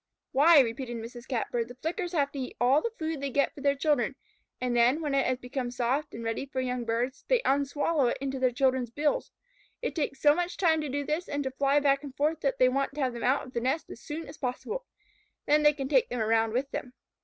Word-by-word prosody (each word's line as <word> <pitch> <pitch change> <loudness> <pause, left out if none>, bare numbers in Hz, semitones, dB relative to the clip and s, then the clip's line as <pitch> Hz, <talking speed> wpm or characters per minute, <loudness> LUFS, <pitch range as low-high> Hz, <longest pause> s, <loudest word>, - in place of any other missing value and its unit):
"Why," 300 +3 +7
repeated 240 0 -3
Mrs. 235 +2 -9
Catbird, 235 -2 -1
"the 245 - -11
Flickers 345 - -3
have 285 -4 +1
to 280 - -6
eat 255 - -5
all 260 +5 +4
the 465 - -1
food 315 -3 -3
they 280 - -2
get 280 +2 +1
for 285 - -11
their 280 0 +2
children, 280 -2 +1 0.4
and 250 -1 -1
then, 240 +5 +4
when 300 -3 -2
it 275 -1 +2
has 255 0 +1
become 250 0 -4
soft 250 +4 -1
and 230 - -6
ready 225 +4 -2
for 260 - -4
young 250 -1 -2
birds, 240 +4 -2
they - - +4
unswallow 285 +1 +2
it - - 0
into 270 0 -3
their 255 -1 +3
children's 255 -1 +1
bills. 290 +5 -1 0.5
It - - -3
takes 285 -4 -2
so 290 -1 +6
much 350 +2 -2
time 320 -4 +3
to 300 - -4
do 285 +2 -2
this 315 +5 -2
and 285 0 -1
to 265 - -3
fly 275 +2 +2
back 275 0 +2
and 275 -2 -8
forth 305 +2 +1
that 275 -3 0
they 255 - +5
want 275 +2 0
to 295 - -3
have 255 -2 0
them 235 - -6
out 265 +3 +2
of 255 - -13
the 235 - -1
nest 265 +6 -1
as - - -10
soon 320 +2 -6
as - - -10
possible. 430 - -4 0.6
Then 300 +1 +4
they 295 0 +6
can 275 -2 -4
take 470 - +3
them 245 - -3
around 225 0 +2
with 270 +3 -1
them." 250 - -5
275 Hz, 250 wpm, -28 LUFS, 250-295 Hz, 0.6 s, Why